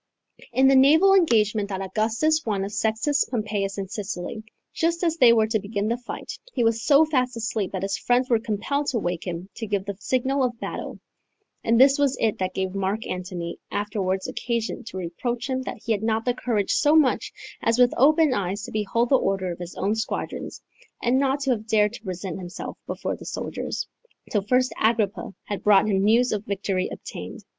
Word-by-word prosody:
In 260 +3 +4
the 270 - +6
naval 315 +9 +6
engagement 220 - +3
that 190 -2 -3
Augustus 225 +11 +1
won 200 -3 -1
of 200 - -6
Sextus 220 +7 +1
Pompeius 210 -4 -2
in 195 -1 -3
Sicily, 200 0 -5 0.3
just 335 +1 0
as 330 -1 +1
they 245 -6 +7
were 225 -2 +4
to 220 0 0
begin 205 +1 -2
the 235 - 0
fight, 245 - -7
he 245 - +1
was 225 0 +1
so 290 +3 +6
fast 255 -5 0
asleep 220 -3 -2
that 190 -1 -4
his 195 0 -1
friends 245 +1 +2
were 235 -3 +3
compelled 230 +7 -2
to 260 - 0
wake 175 -4 -2
him 175 +1 -4
to 225 - -4
give 200 -2 -1
the 200 -1 -4
signal 260 +3 0
of 240 -2 -2
battle: - - -5 0.6
and 230 +1 +3
this 275 +2 +6
was 280 -2 +2
it 220 -2 +1
that 185 0 -2
gave 190 -1 -2
Mark 195 +3 -2
Antony 180 -2 -5
afterwards 200 -2 -2
occasion 235 0 -3
to 190 - -7
reproach 235 +8 -3
him 260 -1 -1
that - - -6
he 230 - -1
had 205 -2 +1
not 220 0 0
the 245 - +2
courage 225 -5 -1
so 295 +1 +4
much 295 -5 +3 0.3
as 230 +1 +2
with 245 -1 +5
open 305 +2 +4
eyes 195 -1 -2
to - - -7
behold 225 +3 0
the 275 - +5
order 190 -4 -1
of 170 - -7
his 175 0 -7
own 200 +3 0
squadrons, 220 +1 -4 0.4
and 250 +2 +3
not 275 +1 +1
to 275 -1 +1
have 220 -2 -2
dared 210 -1 +3
to - - -9
present 185 -3 -5
himself 180 -1 -7
before - - -3
the - - -12
soldiers, - - -4 0.5
till 205 - +2
first 255 +5 +1
Agrippa 220 -3 +1
had 205 - -5
brought 210 0 +5
him 195 -2 +2
news 235 +4 +4
of 210 -1 -2
the - - -33
victory 195 -2 -1
obtained. - - -8
220 Hz, 205 wpm, -24 LUFS, 195-255 Hz, 0.6 s, they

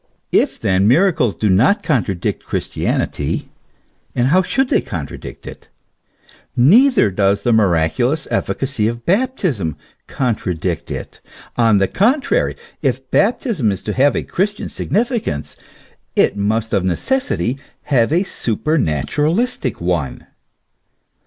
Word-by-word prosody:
If - - +1
then 95 +1 +2
miracles 130 - +3
do 110 - 0
not 110 - +3
contra 115 - 0
dict 85 - -3
Christianity, - - -2 0.7
and 125 +1 +2
how 185 +5 +5
should 265 +8 0
they - - +3
contradict 75 -7 -7
it? - - -10 0.9
neither 210 - +5
does 100 +1 +1
the 120 - +2
miraculous 110 - +1
efficacy 130 -6 -1
of 120 +1 -4
baptism 180 - 0 0.3
contradict 90 - -2
it. - - -7 0.3
On 115 -3 +4
the 95 0 +2
contrary, 275 - +1 0.3
if 130 -2 -2
baptism 205 - +1
is 95 - -5
to 105 - -3
have 140 +5 +3
a - - -1
Christian 205 +3 -2
significance 215 - -2 0.6
it - - +3
must 110 +2 -1
of 95 - +2
necessity 135 - -1 0.2
have 130 -3 +2
a 175 +4 +3
supernaturalistic 150 - -1
one. 85 -7 -2
125 Hz, 120 wpm, -18 LUFS, -, 0.9 s, how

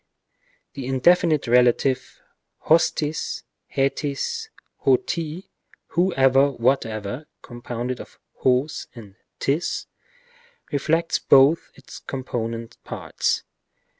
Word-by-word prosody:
The 135 -3 -6
indefinite 155 +3 +3
relative 125 +2 +2 0.5
ὅστις, 155 -1 +1 0.3
ἥτις, 140 +1 -1 0.3
ὅ 130 -2 +4
τι, 165 +2 -4 0.4
whoever, 140 -6 +4
whatever, 120 0 -1 0.2
(com 120 -1 -11
pounded 120 +1 -4
of - - -14 0.3
és 130 +4 +1
and 105 -5 -12 0.2
7is,) 150 +5 -1 0.9
inflects 165 +3 +1
both 140 +5 +5
its 135 - -12
component 115 -3 -5
parts. - - -2
135 Hz, 85 wpm, -23 LUFS, 125-155 Hz, 0.9 s, both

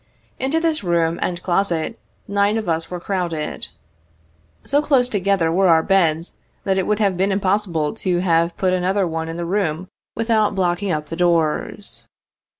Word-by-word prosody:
Into 270 +5 +1
this 325 -6 0
room 170 -2 +1
and 175 -1 -2
closet, 180 +2 0 0.3
nine 200 +1 +2
of 220 - -3
us 165 -1 -1
were 180 - -5
crowded. 175 -5 -3 1.0
So 285 +2 +2
close 270 -5 +3
together 195 -6 +1
were 190 +3 +3
our 165 -2 +5
beds, 165 -3 +1 0.3
that 190 -1 +1
it 185 - -1
would 210 - +2
have 200 -3 +1
been 190 +3 +1
impossible 190 -5 0
to 185 -5 -1
have 170 -1 +1
put 185 -1 +1
another 185 +2 +1
one 160 -1 -3
in 165 - -5
the 170 - -3
room 180 -1 -1 0.3
without 220 -3 +1
blocking 185 +1 0
up 150 -2 -1
the 165 - -4
doors. 170 +3 0
185 Hz, 165 wpm, -21 LUFS, 170-205 Hz, 1.0 s, our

